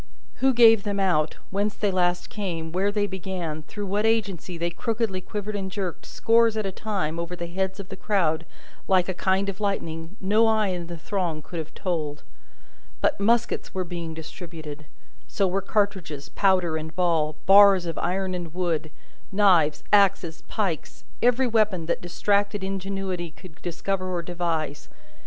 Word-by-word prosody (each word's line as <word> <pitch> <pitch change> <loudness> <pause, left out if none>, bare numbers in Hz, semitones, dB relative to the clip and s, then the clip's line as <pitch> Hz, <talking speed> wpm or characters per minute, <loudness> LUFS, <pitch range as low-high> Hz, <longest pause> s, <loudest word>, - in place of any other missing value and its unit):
Who 265 0 +4
gave 225 -3 +7
them 200 -1 -2
out, 175 -6 +1
whence 205 +2 0
they 205 -2 0
last 180 -1 0
came, 175 -7 -4
where 190 +4 +1
they 205 0 +1
began, 185 -5 -4
through 205 +6 -6
what 200 +2 0
agency 200 -6 0
they 170 +1 -1
crookedly 220 -1 -1
quivered 210 +2 -5
and 195 -1 -3
jerked, 190 -3 -4
scores 230 -1 +3
at 215 - -1
a 195 - -1
time, 185 -6 -2
over 170 +1 -4
the 175 - -5
heads 190 +3 -2
of 195 - -7
the 195 - -6
crowd, 170 -5 0 0.4
like 185 -2 +3
a 185 - -1
kind 190 +2 +1
of 195 -1 -4
lightning, 165 -4 -3
no 215 +4 +3
eye 220 -2 +2
in 175 -2 -3
the 170 0 -6
throng 165 -3 -2
could 170 - -6
have 160 - -7
told; 155 -6 -3 0.8
but, - - +1
muskets 230 +1 +1
were 185 - 0
being 170 -2 -5
distributed 160 -2 -8 0.4
so 195 - +1
were 190 +2 0
cartridges, 195 -8 -1
powder, 185 -5 +2
and 160 0 -7
ball, 165 -4 +1
bars 195 -2 +7
of 165 - -3
iron 185 +1 -1
and 175 -2 -5
wood, 170 -3 -1 0.4
knives, 180 -7 +4
axes, 195 -5 +3
pikes, 190 -8 -3 0.2
every 245 +2 +4
weapon 215 -7 +2
that 170 - -1
distracted 200 +3 0
ingenuity 190 -2 -3
could 160 0 -15
discover 185 +2 -2
or 175 -1 -2
devise. 165 -4 -3
185 Hz, 165 wpm, -25 LUFS, 170-200 Hz, 0.8 s, gave